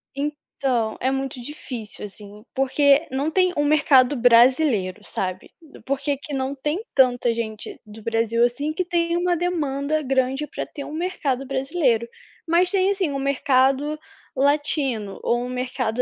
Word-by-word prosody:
Então, 275 -5 -2
é 260 - +1
muito 270 -1 -3
difícil 240 -5 -8
assim, 205 +1 -11
porque 280 +3 +3
não 275 +4 -1
tem 365 0 +2
um 290 - +2
mercado 290 -3 +4
brasileiro, 240 -4 +4
sabe? 185 -2 -4 0.3
Por 275 0 -1
que 285 +1 -2
aqui 285 +1 -5
não 265 0 -1
tem 300 +9 -2
tanta 245 -3 +3
gente 220 -2 -5
do 215 +1 -12
Brasil 230 +1 +1
assim 285 +6 0
que 365 - -1
tem 340 -1 0
uma 350 -1 +1
demanda 310 -4 -1
grande 270 +1 0
para - - -5
ter 285 - -8
um 295 - -8
mercado 300 -6 -2
brasileiro. 265 -3 0 0.4
Mas 350 +2 +3
tem 385 -1 +2
assim, 385 -6 0
um 275 - -3
mercado 275 +1 +2 0.4
latino, 275 -6 0
ou 240 0 +1
um 250 - -6
mercado 250 -2 -2
270 Hz, 155 wpm, -23 LUFS, 240-300 Hz, 0.4 s, mercado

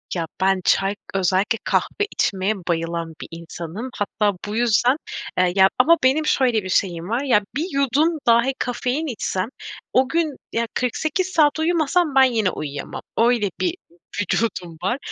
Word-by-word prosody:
Ya, 170 -2 -1 0.2
ben 190 0 +2
çay 195 +1 +2 0.2
özellikle 195 +4 +1
kahve 415 - 0
içmeye 195 +2 0
bayılan 170 -2 -3
bir - - -7
insanım. 170 +7 -7
Hatta 205 -1 0
bu 210 - -4
yüzden, 240 +2 +3 0.4
e, - - +4
ya 190 0 +6
ama 330 +6 +6
benim 275 +4 +3
şöyle 245 -8 +2
bir 185 - -6
şeyim 175 -1 0
var. 245 +5 0
Ya, 245 -7 +3
1 310 - 0
yudum 280 +4 +2
dahi 235 +3 +4
kafein 250 +5 -2
içsem 215 -4 -2 0.4
o 260 0 +3
gün 325 -4 0 0.2
ya 230 0 0
48 315 +9 -1
saat 315 -4 +3
uyumasam 325 -1 +1
ben 265 - +7
yine 225 -7 +2
uyuyamam. 145 -4 -6 0.2
Öyle 230 -3 +3
bir 350 -1 0 0.5
vücudum 180 -5 -2
var. 240 +7 0
230 Hz, 155 wpm, -22 LUFS, 190-275 Hz, 0.5 s, ben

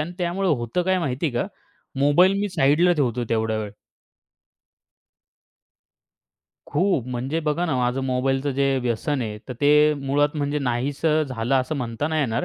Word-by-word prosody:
आणि 160 +4 -4
त्यामुळे 180 +2 -1
होतं 120 +3 0
काय 185 +1 +1
माहिती 140 -1 -2
आहे 145 - -2
का? 120 - 0 0.5
मोबाईल 145 +7 +5
मी 205 - -1
साइडला 170 +1 +3
ठेवतो 125 -6 0
तेवढा 110 -1 0
वेळ. 105 -1 -4 3.0
खूप. 150 - 0
म्हणजे 130 +6 -2
बघा 155 +3 -1
ना 145 - 0
माझं 125 +1 0
मोबाईलचं 135 +2 0
जे 135 0 +1
व्यसन 125 +3 -1
आहे. 105 -1 -5
तर - - -3
ते 150 +1 +5
मुळात 145 +2 0
म्हणजे 145 0 -1
नाहीसं 140 +5 0
झालं 120 +1 -1
असं 150 +5 -4
म्हणता 125 +2 -3
नाही 160 -1 0
येणार. 115 -3 -1
140 Hz, 155 wpm, -23 LUFS, 125-155 Hz, 3.0 s, मोबाईल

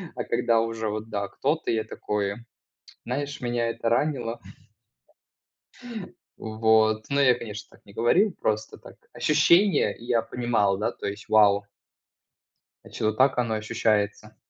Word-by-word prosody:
А - - -3
когда 115 -1 +1
уже 115 -1 -3
вот, 110 +1 -5
да, 100 -2 -2
кто-то, 150 - -2
я 110 -1 0
такой, 100 -1 -3 0.7
знаешь, 145 +4 -4
меня 120 -2 -1
это 115 - -2
ранило. 120 -2 0 2.0
Вот, 110 0 +2
ну 140 - +1
я, 130 -3 +5
конечно, 110 -2 -8
так - - -31
не 100 - -16
говорил. 175 - +3
Просто 110 0 -2
так - - -14 0.2
ощущение 170 +6 +3
я 120 -1 0
понимал. 115 -5 0
Да, 115 +3 -1
то - - -7
есть 100 +1 -6
вау. 100 -2 +4 1.2
Значит, - - -11
вот 110 0 +1
так 135 0 +3
оно 115 -3 0
ощущается. 110 -2 -1
115 Hz, 135 wpm, -25 LUFS, 110-125 Hz, 2.0 s, я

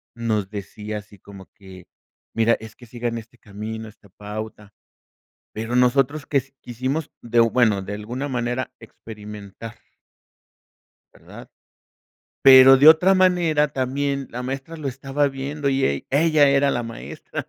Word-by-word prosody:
nos 110 -4 -2
decía 105 +1 -7
así 105 -1 -13
como 100 0 -13
que: 95 -4 -14 0.5
"Mira 115 +1 +3
es 110 -1 -12
que 120 - -16
sigan 120 0 -4
este 115 +2 -12
camino, 110 0 -8
esta 105 -1 -18
pauta". 105 +1 -9 0.8
Pero 115 +3 -3
nosotros 135 +4 +2
que 140 -2 +1 0.2
quisimos 130 +6 -4
de, 120 0 0
bueno, 115 -4 +3
de 100 - -6
alguna 120 +7 -5
manera 125 0 -3
experimentar. 105 0 -11 1.4
¿Verdad? - - -14 0.9
Pero 135 0 +9
de 140 +3 +7
otra 180 +5 +6
manera 175 -5 +2
también 140 +1 -2
la 125 +1 -6
maestra 135 +5 -6
lo 150 -3 -4
estaba 135 +2 -1
viendo 140 +2 -4
y 135 0 +1
ell 70 0 -1
ella 150 0 +4
era 140 0 +3
la 120 - -2
maestra, 115 0 -8
120 Hz, 135 wpm, -22 LUFS, 110-140 Hz, 1.4 s, Pero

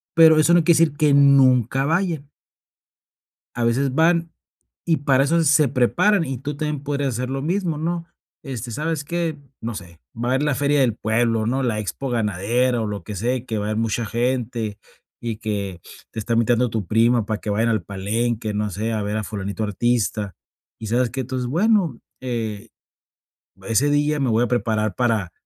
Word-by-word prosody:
pero 160 -1 +7
eso 160 +2 +4
no 175 -1 +5
quiere 170 0 +4
decir 155 -3 +2
que 150 -2 +3
nunca 135 -2 +4
vayan. 165 -3 -1 1.3
A 120 - -1
veces 130 +3 +1
van 165 +1 +2 0.5
y 165 -2 +2
para 135 -1 +3
eso 165 +4 +2
se 150 0 +4
preparan, 165 - +2
y 135 -3 -4
tú 145 +3 -5
también 150 -2 -3
podrías 140 -2 -2
hacer 125 +2 -3
lo 135 0 -2
mismo, 170 +1 -1
¿no? 165 +1 -2 0.4
Este, 125 -4 -6
¿sabes 155 +4 -2
qué? 165 -1 -2 0.2
No 115 0 -4
sé, 90 -5 -10 0.2
va 120 +1 -3
a 125 - +1
haber 135 - +1
la 150 -1 +1
feria 145 +2 +1
del 125 -5 +2
pueblo, 110 0 0
¿no? 130 +3 0
La 115 -4 0
expo 125 +5 -4
ganadera 115 +3 0
o - - -2
lo 105 -2 -5
que 105 - -6
sea, 120 +7 0
y 125 - -4
que 110 - -3
va 105 - -2
a - - -2
haber 110 - -1
mucha 115 +1 -1
gente, 120 -2 -2 0.4
y 115 -2 -3
que 100 -5 -4 0.3
te - - -9
está 115 +2 -1
invitando 120 +2 +2
tu 110 -5 -3
prima, 115 +2 +3
para 105 -1 -3
que - - -7
vaya 110 +3 +1
al 110 -5 0
palenque, 110 +4 -2
no 105 0 -1
sé, 110 +5 -3
a 110 - -1
ver 105 +1 -2
a 110 - -2
fulanito 100 +1 -4
artista, 105 -1 -1 0.4
¿Y 110 - -6
sabes 120 +2 +1
qué? 130 -2 -3
Tú 130 +1 -5
dices: 125 -1 -2
"Bueno, 180 - +2 0.2
eh, 115 -5 -4 1.0
ese 130 +6 +2
día 145 +1 +1
me 130 - +1
voy 115 +1 +2
a 120 - -2
preparar 110 -4 0
para 110 -8 0
120 Hz, 200 wpm, -22 LUFS, 110-145 Hz, 1.3 s, pero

